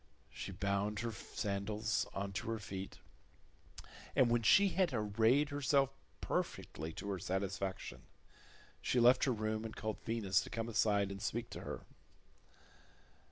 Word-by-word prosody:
She -, -, -6 dB
bound 100 Hz, +2 st, -1 dB
her 115 Hz, 0 st, -2 dB
sandals 105 Hz, +2 st, -2 dB
on 100 Hz, 0 st, -3 dB
to 100 Hz, -, -3 dB
her 115 Hz, -, 0 dB
feet, 95 Hz, -2 st, -6 dB, 1.2 s
and 120 Hz, -2 st, +5 dB
when 120 Hz, 0 st, +3 dB
she 195 Hz, -, +6 dB
had 185 Hz, -2 st, +2 dB
arrayed 115 Hz, +5 st, +3 dB
herself 140 Hz, -1 st, +2 dB, 0.3 s
perfectly 80 Hz, +2 st, -2 dB
to 100 Hz, -, -5 dB
her 95 Hz, -, -2 dB
satisfaction, 95 Hz, +1 st, -3 dB, 0.8 s
she 125 Hz, -, +2 dB
left 125 Hz, +2 st, +6 dB
her 135 Hz, -, +2 dB
room 110 Hz, -1 st, -1 dB
and 110 Hz, -, -6 dB
called 110 Hz, -1 st, -4 dB
Venus 105 Hz, -4 st, +2 dB
to -, -, -8 dB
come 115 Hz, 0 st, -3 dB
aside 105 Hz, -3 st, +2 dB
and 100 Hz, 0 st, -6 dB
speak -, -, -2 dB
to -, -, -6 dB
her. -, -, -6 dB
110 Hz, 145 wpm, -36 LUFS, 100-120 Hz, 1.2 s, she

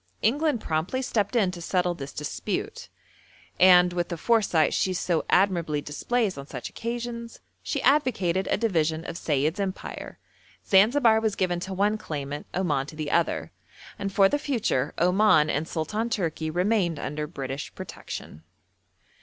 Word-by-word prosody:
England 290 Hz, +3 st, +2 dB
promptly 160 Hz, +8 st, -2 dB
stepped 225 Hz, -1 st, -1 dB
in 200 Hz, -6 st, +3 dB
to 175 Hz, -1 st, -8 dB
settle 180 Hz, 0 st, 0 dB
this 140 Hz, -4 st, -7 dB
dispute, 150 Hz, -, -4 dB, 0.7 s
and, 180 Hz, -1 st, +7 dB
with 175 Hz, -1 st, -1 dB
the 170 Hz, -, -4 dB
foresight 195 Hz, -6 st, +2 dB
she 185 Hz, -, +1 dB
so 175 Hz, -2 st, 0 dB
admirably 175 Hz, -6 st, +2 dB
displays 195 Hz, -, -1 dB
on 140 Hz, -, -9 dB
such 125 Hz, -4 st, -7 dB
occasions, 235 Hz, 0 st, -5 dB, 0.2 s
she -, -, -3 dB
advocated 195 Hz, -, +2 dB
a -, -, +2 dB
division 165 Hz, -7 st, 0 dB
of 170 Hz, -, -5 dB
Sayid's 155 Hz, +1 st, 0 dB
empire. 195 Hz, -1 st, -5 dB, 0.5 s
Zanzibar 220 Hz, +3 st, +5 dB
was 220 Hz, -2 st, 0 dB
given 175 Hz, -2 st, 0 dB
to 190 Hz, +2 st, -5 dB
one 205 Hz, +3 st, +1 dB
claimant, 145 Hz, -5 st, -5 dB
Oman 150 Hz, -7 st, 0 dB
to 155 Hz, -, -10 dB
the 155 Hz, -2 st, -4 dB
other, -, -, 0 dB, 0.5 s
and 200 Hz, -1 st, -3 dB
for 195 Hz, 0 st, +5 dB
the 290 Hz, -, 0 dB
future 220 Hz, -, 0 dB
Oman 180 Hz, -3 st, +4 dB
and 155 Hz, +3 st, -1 dB
Sultan 210 Hz, +10 st, -2 dB
Tourki 165 Hz, -7 st, -2 dB
remained 180 Hz, 0 st, +1 dB
under 150 Hz, +2 st, -4 dB
British 135 Hz, -3 st, -5 dB
protection. 80 Hz, -, -8 dB
180 Hz, 150 wpm, -26 LUFS, 155-215 Hz, 0.7 s, and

